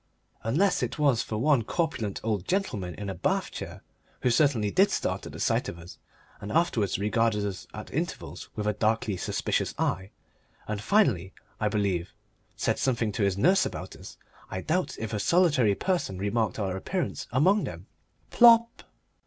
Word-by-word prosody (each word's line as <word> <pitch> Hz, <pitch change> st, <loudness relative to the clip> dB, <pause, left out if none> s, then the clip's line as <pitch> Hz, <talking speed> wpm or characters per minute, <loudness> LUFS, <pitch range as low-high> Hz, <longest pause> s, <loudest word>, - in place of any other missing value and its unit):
Unless 175 Hz, -, +2 dB
it -, -, -2 dB
was 140 Hz, -6 st, +3 dB
for 110 Hz, -, -4 dB
one 140 Hz, +2 st, +3 dB
corpulent 110 Hz, -, -2 dB
old 105 Hz, -4 st, -1 dB
gentleman 105 Hz, -, -1 dB
in 105 Hz, -, -6 dB
a 95 Hz, -, -3 dB
bath -, -, -1 dB
chair, -, -, -8 dB, 0.4 s
who 125 Hz, -, +3 dB
certainly 115 Hz, -6 st, +2 dB
did 195 Hz, +2 st, +4 dB
start -, -, -2 dB
at -, -, -8 dB
the -, -, -9 dB
sight -, -, +1 dB
of 85 Hz, -, -7 dB
us 85 Hz, +1 st, -12 dB, 0.4 s
and 100 Hz, -, -6 dB
afterwards 125 Hz, -, +1 dB
regarded 105 Hz, +1 st, +1 dB
us 95 Hz, -3 st, -5 dB
at -, -, -9 dB
intervals -, -, -4 dB
with 105 Hz, -, -3 dB
a 105 Hz, -, +1 dB
darkly 110 Hz, 0 st, 0 dB
suspicious -, -, -1 dB
eye, 95 Hz, +2 st, -1 dB, 0.6 s
and, 105 Hz, -1 st, -3 dB
finally, 105 Hz, -, +2 dB, 0.3 s
I 105 Hz, -, +1 dB
believe, 100 Hz, -5 st, -1 dB, 0.4 s
said -, -, 0 dB
something 120 Hz, -4 st, +1 dB
to 105 Hz, -, -4 dB
his 100 Hz, -1 st, +1 dB
nurse 185 Hz, -, +4 dB
about -, -, -5 dB
us, -, -, -11 dB, 0.3 s
I 95 Hz, -1 st, -4 dB
doubt 175 Hz, -, -1 dB
if 110 Hz, 0 st, -5 dB
a 105 Hz, -, -1 dB
solitary 145 Hz, -, +3 dB
person 175 Hz, -, -1 dB
remarked 105 Hz, +1 st, -1 dB
our 100 Hz, -3 st, -1 dB
sudden 95 Hz, -, -3 dB
appearance 180 Hz, -, -3 dB
among 185 Hz, -, +3 dB
them. -, -, -7 dB, 0.5 s
Plop! 235 Hz, -1 st, +6 dB
110 Hz, 175 wpm, -27 LUFS, 100-155 Hz, 0.6 s, Plop